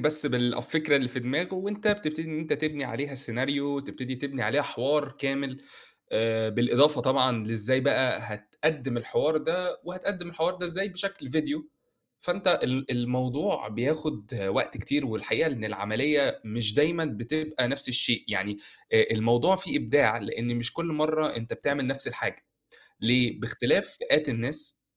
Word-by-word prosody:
بس 150 0 +8
بالفكرة 125 +4 0
اللي 130 -3 0
في 130 +1 -5
دماغه 150 +10 -2
وأنت 205 +3 -2
بتبتدي 160 -6 -1
إن 155 - -4
أنت 160 0 -4
تبني 150 -1 -2
عليها 140 +2 -5
السيناريو 140 +3 +1
تبتدي 130 -2 -7
تبني 135 -1 -5
عليها 145 +4 +1
حوار 145 +3 -1
كامل، 135 -1 -3 0.5
آآ 110 0 0
بالإضافة 120 +6 +3
طبعًا 130 -5 +1
لإزاي 115 +4 +4
بقى 130 -1 +2
هتقدّم 125 +5 -4
الحوار 145 +6 -1
ده 180 +3 -2
وهتقدّم 180 0 -5
الحوار 170 +1 -2
ده 180 0 -3
إزاي 190 +4 +1
بشكل 195 -5 -3
فيديو. 290 - -3 0.5
فأنت 180 +1 +2
ال 130 +1 -2
الموضوع 125 +3 -2
بياخد 130 0 -4
وقت 95 - -1
كتير 145 -1 -2
والحقيقة 110 +6 -1
إن 115 -6 -6
العمليّة 110 +8 0
مش 110 -1 +1
دايمًا 165 +4 +1
بتبقى 150 +1 -3
نفس 140 +1 +6
الشيء، 120 -2 +5
يعني 100 +2 -3 0.4
آآ 110 - +5
الموضوع 120 +11 +2
فيه 195 +10 0
إبداع 145 - +2
لإن 120 +3 -4
مش 120 0 +2
كل 170 - -4
مرّة 155 -2 -1
أنت 115 0 -7
بتعمل 140 -2 -2
نفس 135 +1 +1
الحاجة، - - -5 0.6
ليه؟ 120 +1 +2
باختلاف - - +1
فئات 150 +1 +2
الناس، 140 +4 +5
140 Hz, 150 wpm, -26 LUFS, 120-155 Hz, 0.6 s, بس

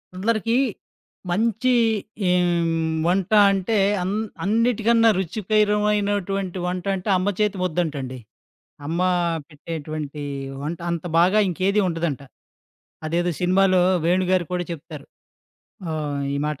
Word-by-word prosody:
అందరికి 225 +3 0 0.8
మంచి 230 +6 +1 0.6
ఎ - - +4 0.2
హ్మ్, 165 -1 0
వంట 185 +2 0 0.2
అంటే 195 +3 0 0.2
అన్ 180 +2 -1 0.3
అన్నిటికన్నా 230 +1 +3
రుచికరమైనటువంటి 205 -1 0
వంట 180 0 -3
అంటే, 190 +2 -5
అమ్మ 185 +2 -1
చేతి 210 -2 +1
ముద్దంటండి. 155 -7 -2 0.7
అమ్మ 165 +4 -2 0.5
పెట్టేటువంటి 155 -1 -6 0.4
వంట 160 +3 -4
అంత 170 0 -4
బాగా 185 +5 +4
ఇంకేది 190 +4 +1
ఉండదంట. 165 -5 -2 0.9
అదేదో 175 +2 0
సినిమాలో 185 0 +3 0.2
'వేణు' 180 +2 +2
గారు 185 -2 +2
కూడా 180 -1 -1
చెప్తారు. 165 -1 -8 0.9
ఆహ్, 145 -2 -3
ఈ - - -1
మాట. 150 -2 -3
180 Hz, 110 wpm, -23 LUFS, 165-205 Hz, 0.9 s, ఎ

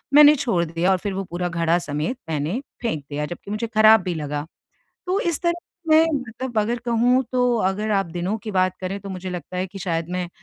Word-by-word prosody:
मैंने 300 0 +9
छोड़ 235 - +1
दिया 170 +3 +1
और 190 - +3
फिर 195 +2 -4
वो 195 +1 -2
पूरा 175 0 -2
घड़ा 170 0 +2
समेत, 155 - -3
मैंने 160 - -1 0.2
फेंक 190 - -2
दिया, 150 0 -2
जबकि 175 +5 -8
मुझे 215 +2 -2
खराब 220 -1 +6
भी 180 - -2
लगा। 150 -1 -3 0.6
तो 370 +2 +1
इस 340 -6 -1
तरह 340 -1 +3
से 340 -3 -11
मैं, 320 - +7 0.2
मतलब 240 0 -4
अगर 235 +3 -1
कहूँ 240 +2 +3
तो, 250 -1 +2
अगर 210 +1 0
आप 195 -2 +2
दिनों 175 +5 -2
की 215 +1 -6
बात 185 -1 +2
करें, 190 +2 -3
तो 200 - -8
मुझे 185 0 -5
लगता 180 0 -6
है 185 - -1
कि 195 +1 -10
शायद 165 -3 -2
मैं, 180 -1 -2
190 Hz, 225 wpm, -23 LUFS, 175-235 Hz, 0.6 s, मैंने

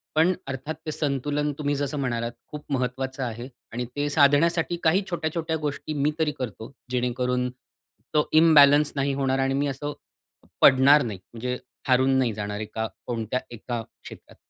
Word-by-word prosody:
पण 165 +4 +4
अर्थात 135 +4 -4
ते 155 - -2
संतुलन 145 0 -1
तुम्ही 145 -1 -1
जसं 145 +1 -2
म्हणालात 120 -3 -1 0.2
खूप 150 -1 -8
महत्त्वाचं 130 +1 -2
आहे 120 +1 -5 0.3
आणि 125 +1 -2
ते 145 0 -1
साधण्यासाठी 160 +4 +3
काही 170 +5 +4
छोट्या-छोट्या 160 -1 -2
गोष्टी 150 0 -4
मी 145 +1 +1
तरी 155 -2 +2
करतो 115 -1 -6 0.2
जेणेकरून 125 0 0 0.6
तो 150 -1 +2
इम्बॅलन्स 150 -2 +6
नाही 140 0 0
होणार 135 -1 0
आणि 135 0 +1
मी 140 +1 0
असं 145 +2 -4 0.7
पडणार 140 +3 +7
नाही. 105 -5 -5
म्हणजे 125 +2 -3 0.3
हारून 130 +1 +4
नाही 120 -4 +1
जाणार 105 0 -4
एका 110 +1 -3 0.2
कोणत्या 115 +1 -2
एका 120 0 -5 0.2
क्षेत्रात. - - -12
135 Hz, 155 wpm, -25 LUFS, 125-150 Hz, 0.7 s, पडणार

